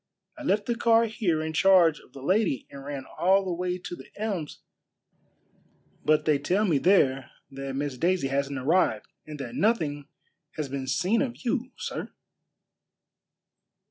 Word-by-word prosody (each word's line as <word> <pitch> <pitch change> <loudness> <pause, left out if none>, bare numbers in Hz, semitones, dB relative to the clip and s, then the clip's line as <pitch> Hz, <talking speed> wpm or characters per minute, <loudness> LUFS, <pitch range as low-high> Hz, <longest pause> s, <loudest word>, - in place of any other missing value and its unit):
I 305 - -11
left 205 -7 +1
the 240 - 0
car 230 0 +4
here 200 -8 -1
in 160 0 -4
charge 175 -3 +5
of - - -20
the 135 - -10
lady 185 - +1
and 140 -1 -9
ran 140 -2 -6
all 190 +2 +4
the 185 - -2
way 180 +1 -2
to 175 -1 -7
The - - -13
Elms; 200 -8 -4 1.4
but 155 0 +3
they 150 -2 +3
tell 185 +9 +1
me 160 -8 +2
there 135 -9 +3 0.2
that 135 0 -6
Miss 140 -2 -3
Daisy 175 -5 +1
hasn't 140 0 -1
arrived 130 -5 +2 0.2
and 150 -1 -7
that 125 -4 -6
nothing 155 -10 0 0.5
has 150 -3 -3
been 135 -1 -4
seen 180 - +1
of 255 -1 -4
you, 250 +1 -1
sir." - - -5
165 Hz, 160 wpm, -27 LUFS, 140-200 Hz, 1.4 s, charge